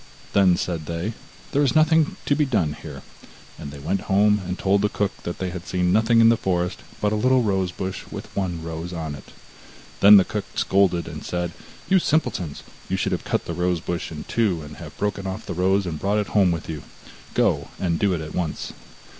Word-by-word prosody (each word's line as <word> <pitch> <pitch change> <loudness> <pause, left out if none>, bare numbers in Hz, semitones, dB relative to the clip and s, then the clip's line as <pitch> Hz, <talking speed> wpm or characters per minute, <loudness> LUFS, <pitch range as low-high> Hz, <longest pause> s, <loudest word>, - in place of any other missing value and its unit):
Then 95 -3 +5
said 80 -4 -3
they: 85 +7 -3 0.4
'There 145 - +2
is 135 -5 +2
nothing 160 0 +4
to - - +2
be 150 - +3
done 105 - +1
here,' - - -9 0.6
and 70 - -6
they 70 - -9
went 75 +8 -3
home 105 +1 +4
and 90 +1 -3
told 100 +1 +2
the 105 - +2
cook 100 0 0
that 85 - -5
they 95 -1 -3
had 90 0 -7
seen 90 0 +1
nothing 115 +2 +4
in 115 - +7
the 115 - +5
forest 90 -3 -1 0.2
but 105 - +1
a - - +1
little 130 +3 +3
rose 95 -4 0
bush 95 +1 -5
with - - -8
one 90 -4 -2
rose 80 +2 -5
on 80 -3 -4
it. 70 - -10 0.7
Then 105 +1 +10
the 95 - +6
old - - -19
cook 105 -2 -2
scolded 95 -3 +2
and 80 -2 -7
said: 90 -1 -2 0.4
'You 190 0 +5
simpletons, 95 - -1 0.3
you - - 0
should - - 0
have - - -1
cut - - -1
the 85 - -4
rose 90 0 0
bush 85 +1 -4
in 75 -2 -6
two, 100 -9 0
and 75 0 -10
have - - -10
broken 100 -1 -2
off 95 +3 -5
the - - -4
rose 95 +3 +2
and 80 -4 -4
brought 100 +2 +1
it 105 -3 -1
home 95 -4 +4
with 85 -1 -3
you; 80 -3 -5 0.5
go, - - +2
and 85 -3 0
do 100 -2 +2
it 80 - -4
at 75 0 -7
once. 85 -4 -3
95 Hz, 225 wpm, -23 LUFS, 85-105 Hz, 0.7 s, Then